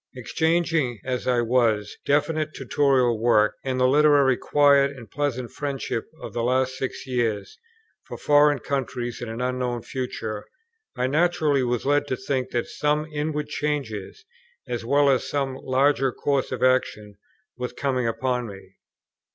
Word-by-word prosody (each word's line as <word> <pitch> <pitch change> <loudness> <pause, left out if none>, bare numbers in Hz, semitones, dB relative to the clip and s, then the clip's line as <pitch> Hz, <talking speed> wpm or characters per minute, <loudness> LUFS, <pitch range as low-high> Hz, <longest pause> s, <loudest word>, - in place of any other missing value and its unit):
Exchanging, 160 -2 0
as 125 -1 -3
I 125 -1 +3
was, 115 -4 +1
definite 155 +2 +1
Tutorial 130 -3 +2
work, 110 -2 +4
and 130 -1 -2
the 130 - +4
literary 145 -1 +5
quiet 140 0 +4
and 120 -3 -11
pleasant 130 -4 -2
friendships 140 -5 -3 0.2
of - - -7
the 120 - -2
last 130 +2 +1
six 130 0 -5
years, 115 -6 -2 0.5
for - - -7
foreign 145 0 +4
countries 125 -3 -3
and 120 - -5
an 115 +2 -5
unknown 125 -1 -2
future, 110 -5 -5 0.5
I 125 - +1
naturally 150 -1 +2
was 120 -2 -1
led 145 +1 +2
to 130 - -2
think 130 -1 -2
that 120 -2 -1
some 150 +1 -1
inward 150 0 -2
changes, 145 - -4 0.4
as 120 -2 -3
well 140 +4 +3
as 135 -2 +2
some 135 -2 -1
larger 135 0 +2
course 140 +2 -1
of - - -3
action, 105 -5 +1 0.4
were 125 0 -4
coming 130 -4 -1
upon 125 +1 -1
me. 95 -2 -12
130 Hz, 150 wpm, -24 LUFS, 120-145 Hz, 0.5 s, literary